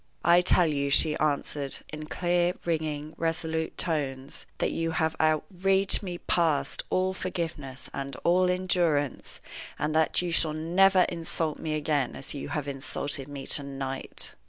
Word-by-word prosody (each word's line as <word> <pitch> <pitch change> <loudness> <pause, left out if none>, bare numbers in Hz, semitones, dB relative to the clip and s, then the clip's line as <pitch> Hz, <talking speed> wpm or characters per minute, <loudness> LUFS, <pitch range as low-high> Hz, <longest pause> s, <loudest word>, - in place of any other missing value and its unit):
"I 175 +1 +6
tell 180 0 +5
you," 140 -3 0
she 150 +2 +4
answered, 145 -2 -1
in 155 0 -7
clear, 175 +1 +1
ringing, 155 -2 -2
resolute 160 -1 -2
tones, 140 -5 -3
"that - - 0
you 165 0 -1
have 160 0 +1
outraged 190 +5 +2
me 180 -4 -5
past 165 -4 0
all 185 +1 +1
forgiveness 165 -8 -4
and 140 -1 -5
all 180 +1 +4
endurance, 175 -6 0 0.4
and 150 +1 -1
that 160 0 +3
you 175 - -2
shall 160 -2 +2
never 180 +4 +4
insult 165 -2 -1
me 155 -1 -2
again 145 -4 0
as 135 - -5
you 140 - -6
have 150 -2 -3
insulted 140 0 -2
me 140 -2 -7
to - - +4
night." 135 -1 -5
155 Hz, 150 wpm, -28 LUFS, 145-175 Hz, 0.4 s, I